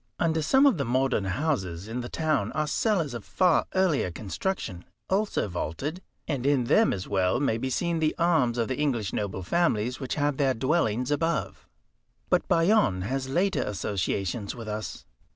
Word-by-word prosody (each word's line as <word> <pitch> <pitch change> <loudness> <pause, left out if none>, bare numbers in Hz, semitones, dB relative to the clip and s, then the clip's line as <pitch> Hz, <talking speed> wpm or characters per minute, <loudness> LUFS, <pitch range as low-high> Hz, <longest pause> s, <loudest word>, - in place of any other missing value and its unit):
Under 160 -1 +1
some 265 - +4
of 260 - +4
the - - +1
modern 130 -4 +1
houses 95 - -2
in 120 +3 -3
the 120 - -6
town 155 -10 0
are 155 0 0
cellars 165 - 0
of 120 -3 -6
far 180 - +2
earlier 180 - +2
construction, 95 - -4 0.3
also 200 - +1
vaulted, 100 - -4 0.3
and 140 -6 -2
in 140 -2 +3
them 215 - +4
as 95 - -4
well 95 +2 +1
may 115 -5 +1
be 130 - -2
seen 170 +5 0
the 155 -1 +1
arms 160 -9 +2
of 115 -2 0
the 130 0 -3
English 120 -10 0
noble 100 -2 -3
families 125 - +1
which 130 -3 -3
had 145 -1 0
their 135 -2 +2
dwellings 125 -2 0
above. 165 +1 -1 0.6
But - - +2
Bayonne 165 - +3
has 130 +5 -2
later 185 +8 +1
associations 100 +1 -2
with 115 -2 -8
us. 105 0 -5
130 Hz, 170 wpm, -27 LUFS, 105-160 Hz, 0.6 s, some